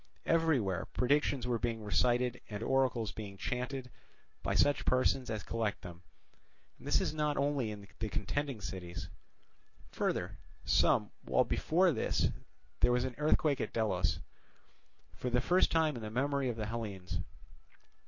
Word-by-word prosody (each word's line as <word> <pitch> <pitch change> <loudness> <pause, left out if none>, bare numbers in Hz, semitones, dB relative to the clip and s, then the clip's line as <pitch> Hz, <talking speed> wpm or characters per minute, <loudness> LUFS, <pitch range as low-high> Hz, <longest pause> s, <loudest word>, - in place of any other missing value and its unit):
Everywhere 140 - +2
predictions 140 -1 +2
were 120 -2 0
being 115 -2 -2
recited 125 +3 +2
and 105 0 -4
oracles 130 -4 +1
being 100 -3 -7
chanted 125 +3 -3 0.5
by - - -1
such 145 0 +3
persons 130 0 +2
as 110 -4 -3
collect 110 -1 -2
them, 90 -1 -9 0.8
and - - -11
this - - +2
not 150 -1 0
only 140 -4 +1
in 100 -1 -8
the 110 - -2
contending 135 +4 -2
cities. 85 -4 -6 0.8
Further, - - -2 0.3
some - - +3
while - - +3
before 180 +3 +3
this, 115 - +1 0.5
there - - +4
was 125 0 +2
an 130 -1 -2
earthquake 150 -1 +2
at - - -3
Delos, 90 -6 +1 1.0
for 125 - -3
the 125 0 +2
first 175 +9 +3
time 160 -3 +2
in 120 - -6
the 110 - -5
memory 135 +3 0
of 120 - -2
the 110 -1 -3
Hellenes. 100 -6 -4
120 Hz, 145 wpm, -33 LUFS, 105-140 Hz, 1.0 s, there